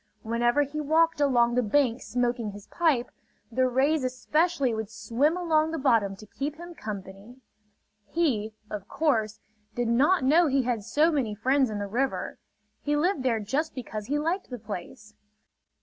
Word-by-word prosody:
Whenever 240 Hz, +5 st, +2 dB
he 295 Hz, +2 st, -4 dB
walked 320 Hz, +1 st, +2 dB
along 240 Hz, -4 st, +3 dB
the 250 Hz, -, +3 dB
bank 245 Hz, +2 st, +1 dB
smoking 240 Hz, -2 st, -1 dB
his 205 Hz, 0 st, -11 dB
pipe, 305 Hz, -8 st, +1 dB, 0.4 s
the 255 Hz, +3 st, +2 dB
rays 275 Hz, +4 st, +2 dB
especially 275 Hz, +1 st, +1 dB
would 220 Hz, -2 st, -4 dB
swim 265 Hz, +9 st, 0 dB
along 320 Hz, -3 st, +2 dB
the 325 Hz, -, -3 dB
bottom 230 Hz, -8 st, +2 dB
to 215 Hz, -, -13 dB
keep 280 Hz, +7 st, -4 dB
him 345 Hz, +2 st, -10 dB
company. 200 Hz, -, -8 dB, 0.7 s
He, 220 Hz, -9 st, 0 dB, 0.2 s
of 205 Hz, -2 st, -5 dB
course, 220 Hz, -9 st, 0 dB, 0.3 s
did 240 Hz, -1 st, 0 dB
not 285 Hz, +9 st, +3 dB
know 315 Hz, +6 st, +5 dB
he 270 Hz, -1 st, +2 dB
had 235 Hz, -4 st, -1 dB
so 305 Hz, +9 st, +2 dB
many 250 Hz, -9 st, -1 dB
friends 260 Hz, +4 st, +2 dB
in 210 Hz, -, -4 dB
the 205 Hz, -, -3 dB
river. 250 Hz, +7 st, -2 dB, 0.4 s
He 295 Hz, 0 st, 0 dB
lived 345 Hz, 0 st, +1 dB
there 245 Hz, -3 st, +1 dB
just 275 Hz, +10 st, -2 dB
because 220 Hz, -4 st, -6 dB
he 290 Hz, -, 0 dB
liked 335 Hz, +6 st, -2 dB
the 250 Hz, -, -5 dB
place. 215 Hz, 0 st, -8 dB
255 Hz, 165 wpm, -27 LUFS, 220-300 Hz, 0.7 s, know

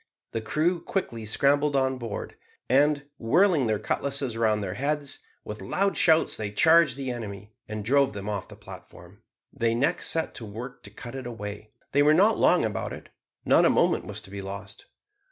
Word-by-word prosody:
The 115 Hz, -, -3 dB
crew 165 Hz, +9 st, 0 dB
quickly 115 Hz, -, -3 dB
scrambled 140 Hz, +5 st, +2 dB
on 130 Hz, -1 st, +1 dB
board, 115 Hz, -4 st, -6 dB, 0.3 s
and, 145 Hz, +3 st, +3 dB
whirling 160 Hz, -, +3 dB
their 110 Hz, -1 st, +1 dB
cutlasses 135 Hz, +3 st, -2 dB
round 110 Hz, -2 st, +1 dB
their 95 Hz, -2 st, -3 dB
heads, 140 Hz, +4 st, -2 dB, 0.3 s
with 105 Hz, 0 st, -7 dB
loud 195 Hz, -, 0 dB
shouts 160 Hz, -1 st, +4 dB
they 105 Hz, -2 st, -3 dB
charged 160 Hz, +4 st, +4 dB
the 135 Hz, -2 st, -3 dB
enemy, 105 Hz, -3 st, -7 dB
and 110 Hz, -1 st, -5 dB
drove 140 Hz, 0 st, +3 dB
them 100 Hz, 0 st, -6 dB
off 105 Hz, -3 st, -3 dB
the -, -, -12 dB
platform. -, -, -13 dB, 0.3 s
They 115 Hz, 0 st, 0 dB
next 125 Hz, +4 st, 0 dB
set 160 Hz, -1 st, -1 dB
to 120 Hz, -, -7 dB
work 120 Hz, +5 st, -8 dB
to -, -, -9 dB
cut 120 Hz, +4 st, -9 dB
it 130 Hz, -2 st, -6 dB
away. 105 Hz, -2 st, -7 dB, 0.2 s
They 145 Hz, -, +3 dB
were 150 Hz, +1 st, +5 dB
not 210 Hz, +6 st, +4 dB
long 180 Hz, -8 st, +4 dB
about 105 Hz, -3 st, -3 dB
it. -, -, -10 dB, 0.4 s
Not -, -, +5 dB
a -, -, +5 dB
moment -, -, +2 dB
was -, -, -7 dB
to 95 Hz, -, -14 dB
be 100 Hz, 0 st, -6 dB
lost. 100 Hz, +1 st, -8 dB
125 Hz, 190 wpm, -26 LUFS, 105-145 Hz, 0.4 s, were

